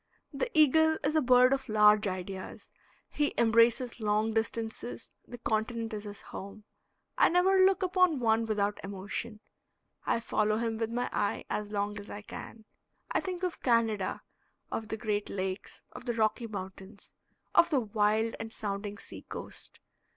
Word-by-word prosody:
The -, -, -2 dB
eagle 315 Hz, +1 st, +5 dB
is 295 Hz, +2 st, 0 dB
a 310 Hz, -, +4 dB
bird 250 Hz, 0 st, +6 dB
of 270 Hz, -1 st, -3 dB
large 210 Hz, 0 st, +5 dB
ideas, 185 Hz, 0 st, -6 dB, 0.4 s
he 295 Hz, -1 st, -1 dB
embraces 235 Hz, +2 st, +3 dB
long 215 Hz, +1 st, +1 dB
distances; 220 Hz, -, -3 dB
the 245 Hz, -, -8 dB
continent 225 Hz, 0 st, -2 dB
is 210 Hz, 0 st, -5 dB
his 205 Hz, -1 st, -8 dB
home. 200 Hz, +2 st, -9 dB, 0.6 s
I -, -, +6 dB
never 370 Hz, +2 st, +4 dB
look 380 Hz, +1 st, +4 dB
upon 365 Hz, -5 st, +3 dB
one 225 Hz, -1 st, +2 dB
without 205 Hz, -1 st, 0 dB
emotion; 200 Hz, +3 st, -5 dB, 0.7 s
I -, -, +2 dB
follow 215 Hz, -2 st, +1 dB
him 225 Hz, -1 st, -2 dB
with 225 Hz, -1 st, -1 dB
my 245 Hz, +1 st, -1 dB
eye 205 Hz, -, -1 dB
as 210 Hz, -1 st, -2 dB
long 205 Hz, 0 st, -2 dB
as 205 Hz, -, -10 dB
I 210 Hz, -, -7 dB
can. 220 Hz, +1 st, -9 dB, 0.5 s
I -, -, +2 dB
think 370 Hz, -1 st, -5 dB
of 360 Hz, -2 st, -2 dB
Canada, 225 Hz, -5 st, +1 dB, 0.5 s
of 220 Hz, -, -3 dB
the 220 Hz, -, -4 dB
Great 210 Hz, -2 st, -2 dB
Lakes, 190 Hz, 0 st, -4 dB
of -, -, -10 dB
the 240 Hz, -, -1 dB
Rocky 225 Hz, +1 st, 0 dB
Mountains, 195 Hz, 0 st, -9 dB, 0.4 s
of -, -, +6 dB
the 280 Hz, -5 st, +2 dB
wild 215 Hz, +1 st, +1 dB
and 225 Hz, 0 st, -6 dB
sounding 205 Hz, -1 st, -4 dB
sea -, -, -10 dB
coast. -, -, -8 dB
220 Hz, 160 wpm, -30 LUFS, 205-245 Hz, 0.7 s, bird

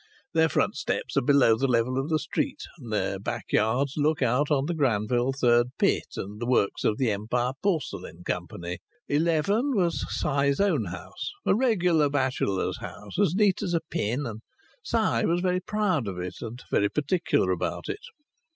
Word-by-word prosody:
Their 160 Hz, 0 st, +4 dB
front -, -, +1 dB
steps -, -, -2 dB
are 140 Hz, -, +4 dB
below 135 Hz, -3 st, +5 dB
the 135 Hz, +5 st, 0 dB
level 125 Hz, +1 st, +1 dB
of 135 Hz, +4 st, -3 dB
the 160 Hz, -, +3 dB
street, 150 Hz, -, -2 dB, 0.2 s
and -, -, -9 dB
their -, -, -1 dB
backyards 125 Hz, +6 st, 0 dB
look 150 Hz, -1 st, +2 dB
out 130 Hz, +4 st, +2 dB
on 140 Hz, -3 st, +2 dB
the 175 Hz, -, -1 dB
Granville 120 Hz, -3 st, +1 dB
Third 120 Hz, -3 st, +3 dB
Pit -, -, +2 dB
and 105 Hz, +3 st, -6 dB
the 120 Hz, -, -2 dB
works 125 Hz, -5 st, +1 dB
of 105 Hz, -, +2 dB
the 125 Hz, -4 st, +1 dB
Empire 120 Hz, +5 st, -1 dB
Porcelain 100 Hz, -, -2 dB
Company. 90 Hz, 0 st, -4 dB, 0.3 s
11 170 Hz, -, +1 dB
was 175 Hz, -4 st, +1 dB
Si's 140 Hz, 0 st, +1 dB
own 200 Hz, 0 st, +2 dB
house, -, -, -6 dB
a -, -, +4 dB
regular 180 Hz, -, +3 dB
bachelor's 130 Hz, -8 st, 0 dB
house, -, -, -7 dB
as 195 Hz, -4 st, +3 dB
neat 205 Hz, -2 st, +3 dB
as 180 Hz, -4 st, -1 dB
a 165 Hz, -, +1 dB
pin, 125 Hz, +7 st, -1 dB
and 110 Hz, -2 st, -6 dB, 0.4 s
Si 230 Hz, -, +1 dB
was 170 Hz, +1 st, +2 dB
very 180 Hz, 0 st, +1 dB
proud 185 Hz, -, 0 dB
of 95 Hz, -2 st, -4 dB
it 90 Hz, 0 st, -6 dB
and 120 Hz, +2 st, -7 dB
very 100 Hz, -, +3 dB
particular 150 Hz, -, +1 dB
about -, -, -2 dB
it. 415 Hz, -, -4 dB
140 Hz, 175 wpm, -27 LUFS, 115-170 Hz, 0.4 s, below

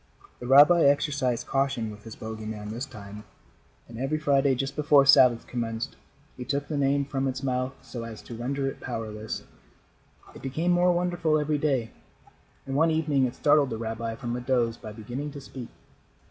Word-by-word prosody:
The 120 Hz, -, -7 dB
rabbi 145 Hz, +6 st, +7 dB
exercised 140 Hz, -3 st, +1 dB
caution 135 Hz, -5 st, 0 dB
with 105 Hz, +1 st, -13 dB
his 115 Hz, -, -8 dB
bogey 110 Hz, -1 st, -7 dB
man 105 Hz, -1 st, -6 dB
this 120 Hz, +5 st, -4 dB
time, 105 Hz, -4 st, -10 dB, 0.6 s
and 115 Hz, 0 st, -9 dB
every 135 Hz, +4 st, 0 dB
Friday, 140 Hz, -3 st, +2 dB
just 135 Hz, +2 st, -3 dB
before 145 Hz, -2 st, +5 dB
Sabbath 130 Hz, -4 st, +6 dB
commenced, 115 Hz, +1 st, -4 dB, 0.4 s
he 125 Hz, -, -5 dB
took 140 Hz, +2 st, -2 dB
the 155 Hz, -, -3 dB
name 140 Hz, 0 st, +2 dB
from 135 Hz, -1 st, -2 dB
its 130 Hz, +1 st, -3 dB
mouth 130 Hz, 0 st, -1 dB
so 120 Hz, -2 st, -7 dB
as 115 Hz, -2 st, -8 dB
to -, -, -9 dB
render 135 Hz, +4 st, -2 dB
it 135 Hz, -, -5 dB
powerless. 110 Hz, -3 st, -5 dB, 0.9 s
It -, -, -12 dB
became 155 Hz, +7 st, -1 dB
more 175 Hz, +1 st, +4 dB
wonderful 175 Hz, -3 st, +1 dB
every 150 Hz, 0 st, 0 dB
day, 135 Hz, -6 st, 0 dB, 0.7 s
and 135 Hz, -, -4 dB
one 160 Hz, +3 st, +4 dB
evening 150 Hz, -4 st, +2 dB
it 120 Hz, -, -3 dB
startled 145 Hz, -2 st, +3 dB
the 115 Hz, -, -4 dB
rabbi 115 Hz, 0 st, -4 dB
from 120 Hz, +1 st, -4 dB
a 125 Hz, -, -4 dB
doze 120 Hz, -2 st, +1 dB
by 110 Hz, -2 st, -9 dB
beginning 120 Hz, +7 st, -6 dB
to 145 Hz, -, -7 dB
speak. 130 Hz, -3 st, -9 dB
130 Hz, 185 wpm, -27 LUFS, 115-145 Hz, 0.9 s, rabbi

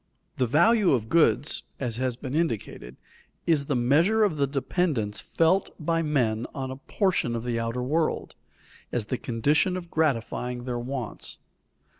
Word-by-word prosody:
The 125 Hz, -, +2 dB
value 180 Hz, -, +4 dB
of 110 Hz, -4 st, -1 dB
goods, 145 Hz, -4 st, +3 dB, 0.2 s
as 120 Hz, -4 st, -2 dB
has 130 Hz, -1 st, -1 dB
been 125 Hz, +2 st, -6 dB
indicated, 115 Hz, -, -2 dB, 0.5 s
is 150 Hz, -4 st, +2 dB
the 145 Hz, -, 0 dB
measure 160 Hz, -, +3 dB
of 195 Hz, -7 st, +1 dB
the 140 Hz, -1 st, +2 dB
dependence 135 Hz, -, -1 dB
felt 175 Hz, +4 st, +2 dB
by 165 Hz, +1 st, 0 dB
men 120 Hz, -8 st, 0 dB
on 130 Hz, -1 st, -3 dB
a 130 Hz, -, -6 dB
portion 165 Hz, -, 0 dB
of 115 Hz, -, -3 dB
the 120 Hz, -1 st, -1 dB
outer 115 Hz, +2 st, -2 dB
world, 155 Hz, +5 st, 0 dB, 0.6 s
as 120 Hz, -4 st, 0 dB
the 125 Hz, +3 st, -3 dB
condition 145 Hz, +10 st, +1 dB
of 175 Hz, -2 st, -8 dB
gratifying 125 Hz, -4 st, -1 dB
their 125 Hz, -1 st, -3 dB
wants. 125 Hz, -2 st, -5 dB
135 Hz, 155 wpm, -26 LUFS, 120-165 Hz, 0.6 s, value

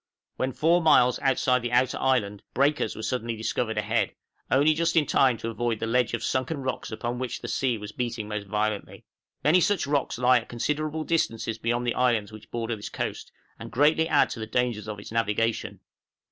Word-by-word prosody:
When 130 Hz, +1 st, -1 dB
four 170 Hz, +6 st, +3 dB
miles 125 Hz, -6 st, +5 dB
outside 130 Hz, -1 st, +2 dB
the 120 Hz, 0 st, -3 dB
outer 125 Hz, +1 st, +2 dB
island, 105 Hz, -7 st, +1 dB
breakers 140 Hz, -3 st, +1 dB
were 110 Hz, -, -7 dB
suddenly 115 Hz, -2 st, -2 dB
discovered 110 Hz, 0 st, -2 dB
ahead, 105 Hz, +1 st, 0 dB, 0.3 s
only 145 Hz, +4 st, +4 dB
just 165 Hz, +1 st, 0 dB
in 160 Hz, -3 st, +4 dB
time 130 Hz, -3 st, +3 dB
to 115 Hz, +1 st, -4 dB
avoid 115 Hz, -1 st, -1 dB
the -, -, -2 dB
ledge 120 Hz, 0 st, +1 dB
of -, -, -6 dB
sunken 135 Hz, +2 st, -1 dB
rocks 130 Hz, -, -3 dB
upon 120 Hz, +2 st, -3 dB
which 130 Hz, -1 st, -3 dB
the -, -, -6 dB
sea 125 Hz, -4 st, 0 dB
was 105 Hz, 0 st, -8 dB
beating 115 Hz, -2 st, -3 dB
most 105 Hz, -1 st, -4 dB
violently. 105 Hz, 0 st, -2 dB, 0.4 s
Many 165 Hz, +5 st, +5 dB
such 205 Hz, -1 st, +2 dB
rocks 145 Hz, -3 st, -1 dB
lie 125 Hz, 0 st, +5 dB
at 115 Hz, -, -13 dB
considerable 150 Hz, +5 st, -2 dB
distances 115 Hz, -9 st, -1 dB
beyond 120 Hz, +2 st, -1 dB
the 120 Hz, -, +1 dB
islands 115 Hz, -4 st, +1 dB
which 110 Hz, -1 st, -12 dB
border 115 Hz, -1 st, -3 dB
this 105 Hz, -, -7 dB
coast, -, -, -4 dB, 0.3 s
and -, -, -8 dB
greatly 155 Hz, +5 st, +3 dB
add -, -, +3 dB
to -, -, -5 dB
the 110 Hz, -, -4 dB
dangers 120 Hz, -2 st, -1 dB
of 105 Hz, -1 st, -5 dB
its 100 Hz, -, -10 dB
navigation. 115 Hz, 0 st, -1 dB
120 Hz, 200 wpm, -26 LUFS, 110-135 Hz, 0.4 s, miles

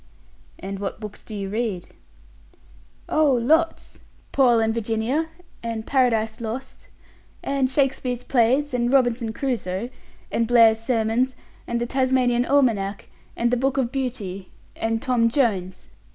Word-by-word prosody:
"And 195 Hz, +1 st, -6 dB
what 200 Hz, +1 st, -4 dB
books 210 Hz, -2 st, -9 dB
do 215 Hz, -, -8 dB
you 195 Hz, -1 st, -4 dB
read?" 210 Hz, -4 st, -3 dB, 1.2 s
"Oh, 305 Hz, -3 st, +3 dB
lots! 310 Hz, +8 st, +1 dB, 0.3 s
'Paul 245 Hz, -4 st, +4 dB
and 225 Hz, 0 st, +1 dB
Virginia', 230 Hz, +7 st, -1 dB, 0.3 s
and 230 Hz, -1 st, -4 dB
'Paradise 230 Hz, -4 st, +1 dB
Lost', 240 Hz, +4 st, -6 dB, 0.6 s
and 275 Hz, -2 st, 0 dB
'Shakespeare's 260 Hz, -2 st, 0 dB
Plays', 260 Hz, +3 st, +2 dB
and 240 Hz, 0 st, +1 dB
'Robinson 245 Hz, -4 st, +2 dB
Crusoe', 235 Hz, -4 st, -3 dB, 0.4 s
and 230 Hz, -, +1 dB
'Blair's 225 Hz, -2 st, +6 dB
Sermons', 230 Hz, +2 st, 0 dB, 0.3 s
and 235 Hz, 0 st, -1 dB
'The 240 Hz, -, -1 dB
Tasmanian 255 Hz, -1 st, +2 dB
Almanack', 225 Hz, -9 st, +1 dB, 0.3 s
and 235 Hz, 0 st, +1 dB
'The 250 Hz, -, +2 dB
Book 270 Hz, +2 st, 0 dB
of 250 Hz, -3 st, 0 dB
Beauty', 220 Hz, -9 st, -4 dB, 0.3 s
and 225 Hz, 0 st, -2 dB
'Tom 245 Hz, -4 st, +2 dB
Jones'." 210 Hz, -8 st, -1 dB
240 Hz, 130 wpm, -23 LUFS, 220-260 Hz, 1.2 s, Blair's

